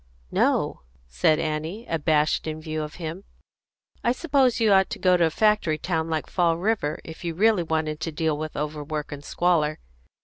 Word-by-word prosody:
"No," - - +1 0.3
said 65 - +2
Annie, 160 +8 -3
abashed 155 -1 +1
in 155 0 -4
view 155 0 -4
of 150 0 -6
him. 170 +2 -6 0.8
"I 240 - +3
suppose 270 -4 +2
you 220 -2 +3
ought 190 0 +4
to - - -4
go 185 -1 +4
to 175 -1 +4
a - - 0
factory 210 -3 +2
town 160 -1 -2
like 160 -2 -1
Fall 170 -2 +1
River, 190 -5 -1
if 160 +2 -10
you 170 -1 -3
really 215 +1 +4
wanted 160 -2 -1
to 165 - -3
deal 160 0 0
with 155 +1 -5
overwork 150 0 -4
and 145 -1 -7
squalor." 155 -3 +1
160 Hz, 180 wpm, -25 LUFS, 155-185 Hz, 0.8 s, ought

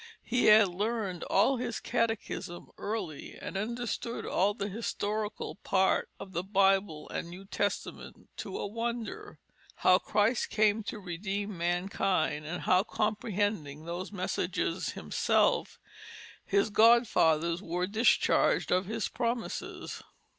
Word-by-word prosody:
He 245 +1 +1
had 215 -2 +7
learned 200 -1 -2
all 270 - +3
his 240 -2 -3
Catechism 225 -6 -2
early, 200 -8 -4
and - - -7
understood 235 +3 -3
all 200 +3 +1
the 200 - -3
historical 210 0 -3
part 190 -2 +1
of 190 - -8
the 175 -1 -1
Bible 195 -4 +2
and 170 - -4
New 185 +3 -10
Testament 205 +1 -4
to - - -5
a - - -3
wonder, 235 - -4 0.4
how 185 0 +5
Christ 215 +4 +1
came 215 0 +3
to 220 - -4
redeem 195 +3 -4
mankind, 175 -3 0
and 180 +3 -4
how 185 0 +4
comprehending 205 -8 -2
those 175 +3 -5
messages 185 -2 -2
himself, - - +1 0.7
his 200 +2 +2
godfathers 185 -8 +4
were 180 -1 -2
discharged 215 +5 +3
of 185 +1 +2
his 220 0 -2
promises. 235 -1 -4
200 Hz, 120 wpm, -30 LUFS, 180-220 Hz, 0.7 s, had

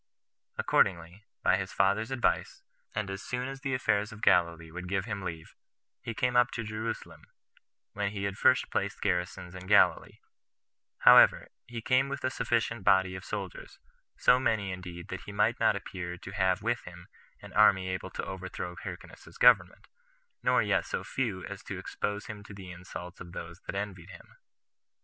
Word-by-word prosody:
Accordingly, 90 +2 +1 0.2
by - - +4
his 95 0 -4
father's 100 +4 +2
advice, 130 -2 0 0.3
and 105 -1 -1
as 95 0 -5
soon 125 +1 -3
as 135 0 -7
the 135 -3 -1
affairs 105 -4 +1
of 110 -1 -12
Galilee 85 -2 +3
would 90 +2 -7
give 95 +1 0
him 105 -4 -4
leave, 80 -3 -6 0.5
he 115 - -5
came 125 +2 0
up 125 0 +5
to 115 - -3
[Jerusalem], 110 +1 -5 0.7
when 100 0 -1
he 100 -1 -5
had 100 -1 -2
first - - +3
placed - - -1
garrisons 90 0 -1
in 95 0 -9
Galilee; 105 +1 +4 0.8
however, - - +7 0.2
he 115 -1 -6
came 130 +3 +3
with 140 - -5
a 130 - 0
sufficient 115 -3 -1
body 95 -1 +4
of 95 - -7
soldiers, 100 -4 -6 0.4
so 125 - +5
many 110 -6 0
indeed 90 -2 -8
that 90 - -6
he - - -5
might 105 +3 +1
not - - +4
appear 90 -1 -6
to 95 - -9
have 95 0 +1
with 120 +1 0
him 90 0 -11 0.4
an - - -11
army 95 -3 +5
able 95 -2 -3
to - - -5
overthrow 95 -1 -6
Hyrcanus's - - -10
government, - - +5 0.6
nor - - +3
yet - - +2
so 480 - -3
few 105 -8 -2
as - - -7
to - - -6
expose 105 0 -4
him 105 -1 -8
to 100 - -10
the 95 -2 -9
insults 90 0 -9
of 85 -1 -10
those 85 +2 -8
that - - -4
envied 100 -3 -5
him. 90 - -14
100 Hz, 175 wpm, -30 LUFS, 90-110 Hz, 0.8 s, however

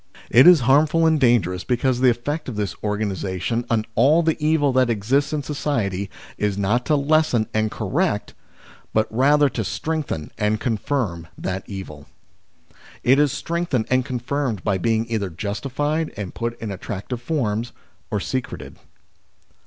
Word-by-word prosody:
95 - - -6
It 130 +7 +9
is 175 -3 +7
harmful 150 +6 +4
and 160 -1 +3
dangerous 105 - +2
because 125 0 0
the 130 0 +5
effect 145 +6 -2
of 120 - -6
this 105 -2 -2
organisation 105 +1 -2
on 110 -2 +1
all 145 +10 +4
the 160 -1 +2
evil 150 -3 +3
that 130 -1 +3
exists 125 +6 +1
in 150 -2 -2
society 110 -10 -2 0.3
is 105 -2 0
not 105 +5 0
to 155 - +3
lessen 145 -5 +2
and 110 0 +1
correct, - - -1 0.6
but 110 0 +3
rather 145 +3 +4
to 115 -3 -3
strengthen 150 - -3
and 105 0 +1
confirm, 110 -7 -2
that 95 0 -3
evil. 85 -8 -8 1.0
It 130 +3 +5
is 145 -2 +3
strengthened 165 -6 -1
and 130 0 +3
confirmed, 125 -3 -2
by 100 -3 0
being 110 +4 +1
either 110 -4 -2
justified 135 - -2
and 100 -3 -5
put 120 0 -4
in 110 -2 -5
attractive 100 +5 -5
forms, 120 -5 -1 0.4
or 105 - -1
secreted. 130 +6 -5
120 Hz, 155 wpm, -22 LUFS, 105-145 Hz, 1.0 s, It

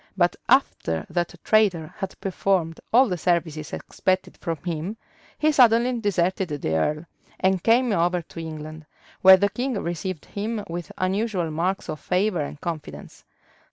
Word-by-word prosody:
But - - +3
after 80 -1 +2
that 175 0 -1
traitor 190 -8 +2
had 195 -2 -5
performed 185 -3 0
all 255 +3 +6
the 180 -4 -2
services 160 -4 -1
expected 185 0 -2
from 165 -3 -3
him, 175 +4 -3 0.4
he 310 +1 +3
suddenly 245 -2 +4
deserted 190 -3 0
the 145 - -2
earl, 150 - 0 0.3
and 190 -1 +2
came 240 +3 +3
over 175 -2 +1
to 165 - -11
England, 155 -1 -7 0.3
where 190 0 +9
the 200 +2 +2
king 250 +5 -2
received 175 -2 -4
him 210 +1 -4
with 170 -1 -6
unusual 185 -2 -1
marks 180 +5 -1
of 155 - -5
favor 185 -1 0
and 145 0 -6
confidence. 160 -3 -7
180 Hz, 150 wpm, -24 LUFS, 160-205 Hz, 0.4 s, where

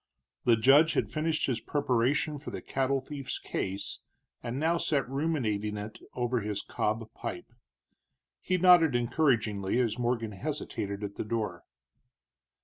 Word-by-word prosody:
The 115 -2 +5
judge 140 +8 +6
had - - 0
finished 155 0 0
his 120 -4 -1
preparation 140 +3 +1
for 145 - -7
the - - -5
cattle 135 0 0
thief's 140 -2 -4
case, 95 +1 -4 0.4
and 120 +2 -4
now 165 +3 +2
sat 140 -6 +1
ruminating 125 -8 -1
it 105 +1 -7 0.2
over 120 -1 0
his 105 -1 -3
cob 110 +1 -2
pipe. - - -6 0.9
He 185 - +1
nodded 175 -6 +6
encouragingly 120 -5 +1
as 120 -1 0
Morgan 120 -2 0
hesitated 105 -4 -4
at 100 0 -5
the - - -2
door. 105 -6 -3
125 Hz, 140 wpm, -30 LUFS, 110-145 Hz, 0.9 s, judge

